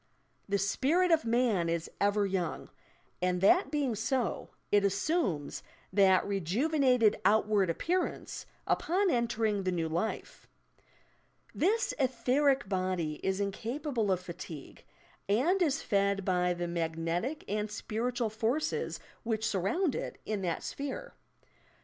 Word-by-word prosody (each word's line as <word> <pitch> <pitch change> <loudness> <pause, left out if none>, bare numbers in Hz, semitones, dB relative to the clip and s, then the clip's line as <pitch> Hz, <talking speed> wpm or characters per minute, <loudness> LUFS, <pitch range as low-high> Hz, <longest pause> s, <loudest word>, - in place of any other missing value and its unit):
"The 200 - +2
spirit 280 - +2
of 320 -5 +3
man 225 -7 +2
is 165 0 -1
ever 205 0 +3
young," 185 -4 -3 0.5
and 180 0 +1
that 360 - +5
being 285 -5 0
so, 230 0 -1 0.2
it 205 -1 +4
assumes 200 - 0 0.3
that 190 -1 +5
rejuvenated 230 - +2
outward 205 -1 +3
appearance, 350 - -2 0.2
upon 375 +2 +1
entering 225 -4 +1
the 185 -1 -1
new 165 -2 -1
life. 170 +7 -3 1.1
This 455 +6 +1
etheric 260 +1 +2
body 185 -5 -1
is 190 0 0
incapable 230 +3 -2
of 185 - +2
fatigue, 170 -5 -9 0.5
and 310 - +3
is 310 -3 +1
fed 200 -1 +1
by 180 -1 +1
the 175 0 -3
magnetic 170 - -2
and 210 +1 -1
spiritual 230 +2 -2
forces 235 +8 -1 0.2
which 220 -1 -1
surround 220 - +1
it - - -4
in 215 -2 -2
that 175 -3 -2
sphere. - - -5
210 Hz, 120 wpm, -31 LUFS, 185-265 Hz, 1.1 s, that